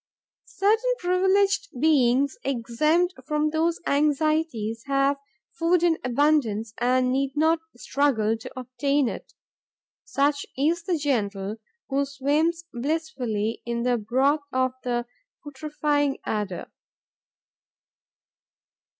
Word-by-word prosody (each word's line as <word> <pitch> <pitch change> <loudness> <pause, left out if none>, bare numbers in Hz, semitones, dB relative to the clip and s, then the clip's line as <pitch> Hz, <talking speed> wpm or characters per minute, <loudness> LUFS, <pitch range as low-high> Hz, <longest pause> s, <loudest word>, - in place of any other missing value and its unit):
Certain 450 +5 +2
privileged 385 - +1
beings, 275 -2 +3
exempt 305 +8 +1
from 300 0 +1
those 325 +2 +1
anxieties, 290 -6 +1
have 275 0 +2 0.3
food 340 +1 +1
in 335 -2 +3
abundance 245 -5 +1
and 250 +1 +2
need 270 +1 0
not 320 +2 +3 0.2
struggle 240 -5 +1
to 235 +3 -9
obtain 270 +2 0
it. - - -7 0.7
Such 285 +1 +1
is 320 +5 +1
the 355 -3 +1
Gentle, 210 -8 -1 0.3
who 275 +1 +1
swims 295 +5 0
blissfully 250 -6 -2
in 235 0 -2
the 245 -1 +1
broth 265 +7 +2
of 255 0 +1
the 240 -1 -1 0.4
putrefying 290 -1 -1
adder. 205 -4 -3
280 Hz, 100 wpm, -25 LUFS, 240-315 Hz, 0.7 s, beings